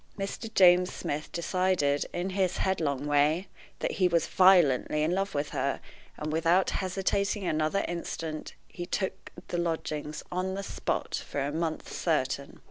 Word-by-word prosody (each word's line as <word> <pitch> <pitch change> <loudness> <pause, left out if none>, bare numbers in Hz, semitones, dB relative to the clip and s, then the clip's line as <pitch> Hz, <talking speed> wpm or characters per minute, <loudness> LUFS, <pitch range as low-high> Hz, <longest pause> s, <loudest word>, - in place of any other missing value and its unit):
Mr. 200 +3 -4
James 180 -1 +6
Smith 150 +2 -4
decided, 170 -4 +1
in 180 +2 -2
his 185 -1 0
headlong 150 -7 0
way, 150 +5 +2 0.3
that - - -2
he 185 - +2
was 170 -2 +2
violently 160 -6 +4
in 160 - +1
love 195 -1 -1
with 145 +1 -1
her, - - -1 0.4
and, 155 0 -3
without 165 +4 +3
hesitating 195 +1 -1
another 155 +3 +1
instant, 165 -2 -5
he 175 -1 -7
took 190 0 -3 0.2
the 175 - -1
lodgings 155 -3 -3
on 185 +1 -1
the 200 - -4
spot - - -3
for - - -3
a 140 +1 -1
month 160 0 -3
certain. 140 -4 -1
170 Hz, 150 wpm, -29 LUFS, 155-185 Hz, 0.4 s, James